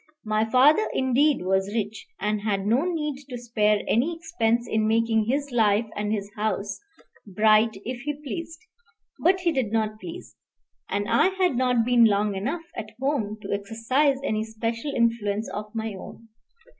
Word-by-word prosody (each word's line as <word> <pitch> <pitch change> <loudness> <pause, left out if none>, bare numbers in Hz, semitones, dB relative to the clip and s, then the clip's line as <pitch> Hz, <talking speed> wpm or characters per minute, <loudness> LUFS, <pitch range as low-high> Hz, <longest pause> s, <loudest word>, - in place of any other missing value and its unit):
My 215 +1 0
father, 285 - +5
indeed, 265 0 +2
was 190 +3 0
rich, 215 -1 -3
and 210 +1 -1
had 200 -2 -1
no 240 +9 +2
need 300 -5 -3
to 250 - -5
spare 215 -3 +1
any 285 +10 +1
expense 240 -9 0
in 220 0 +1
making 225 0 +2
his 280 +4 -1
life 220 -2 +3
and 210 0 -2
his 205 -1 -3
house 210 -1 -2 0.5
bright 215 +2 +3
if 245 0 -4
he 295 +2 -3
pleased; 325 +2 -6 0.6
but 370 +2 +3
he 345 -2 +2
did 260 -8 -1
not 215 -1 -1
please, 340 +8 -9 0.5
and 205 +1 -1
I 235 +8 +4
had 375 -6 +1
not 250 -2 +2
been 240 -1 +5
long 205 -1 +2
enough 270 - -3
at 215 -1 -7
home 255 -7 -1
to - - -3
exercise 230 +8 +1
any 220 -5 0
special 230 +4 -3
influence 225 -3 0
of 210 +1 -4
my 220 -1 -3
own. 225 +4 -11
225 Hz, 165 wpm, -25 LUFS, 210-270 Hz, 0.6 s, father